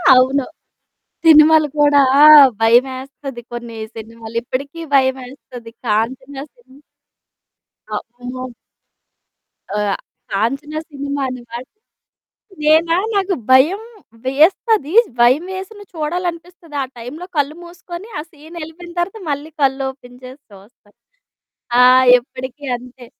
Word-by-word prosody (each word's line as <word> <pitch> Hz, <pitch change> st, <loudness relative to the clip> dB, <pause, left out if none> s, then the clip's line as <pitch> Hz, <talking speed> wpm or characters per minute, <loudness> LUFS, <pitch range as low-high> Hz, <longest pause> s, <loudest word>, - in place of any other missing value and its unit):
అవును. 260 Hz, +2 st, +3 dB, 0.8 s
సినిమాలు 310 Hz, -1 st, +7 dB
కూడా 290 Hz, -1 st, +5 dB, 0.2 s
ఆ! -, -, +10 dB, 0.4 s
భయమేస్తది 260 Hz, +2 st, 0 dB
కొన్ని 235 Hz, -1 st, -7 dB, 0.2 s
సినిమాలు 225 Hz, 0 st, -10 dB
ఇప్పుడికి 275 Hz, +6 st, -5 dB, 0.2 s
భయమేస్తది 260 Hz, -3 st, -2 dB
'కాంచన' 260 Hz, +5 st, -2 dB
సినిమ. 285 Hz, -, -21 dB, 1.1 s
అమ్మో! 245 Hz, +4 st, -7 dB, 1.3 s
ఆహ్, 205 Hz, -1 st, -1 dB, 0.4 s
కాంచన 275 Hz, +9 st, -2 dB, 0.2 s
సినిమా 280 Hz, -1 st, -4 dB
అనమాట. 240 Hz, -1 st, -8 dB, 1.0 s
నేనా 320 Hz, +2 st, +3 dB, 0.2 s
నాకు 390 Hz, -1 st, +1 dB, 0.2 s
భయం 295 Hz, +10 st, +5 dB, 0.5 s
వేస్తది, 315 Hz, -, +2 dB, 0.3 s
భయం 255 Hz, +8 st, +4 dB
వేసిన 385 Hz, +3 st, -8 dB
చూడాలనిపిస్తది. 335 Hz, +1 st, -5 dB
ఆ -, -, -1 dB
టైంలో 290 Hz, +10 st, -8 dB
కళ్ళు 290 Hz, +1 st, 0 dB
మూసుకొని 345 Hz, +3 st, -10 dB
ఆ -, -, -2 dB
సీనెళ్ళిపోయిన 325 Hz, +2 st, -11 dB
తరువాత 390 Hz, +6 st, -2 dB
మళ్ళీ 290 Hz, +2 st, -4 dB
కళ్ళు 270 Hz, 0 st, +1 dB
ఓపెన్ 250 Hz, -2 st, -16 dB
చేసి 260 Hz, +3 st, -11 dB
చూస్తాను. 205 Hz, +1 st, -20 dB, 0.8 s
ఆ! -, -, +7 dB, 0.4 s
ఎప్పుడికి 260 Hz, +3 st, -9 dB
అంతే. 245 Hz, +1 st, -12 dB
275 Hz, 100 wpm, -18 LUFS, 245-320 Hz, 1.3 s, ఆ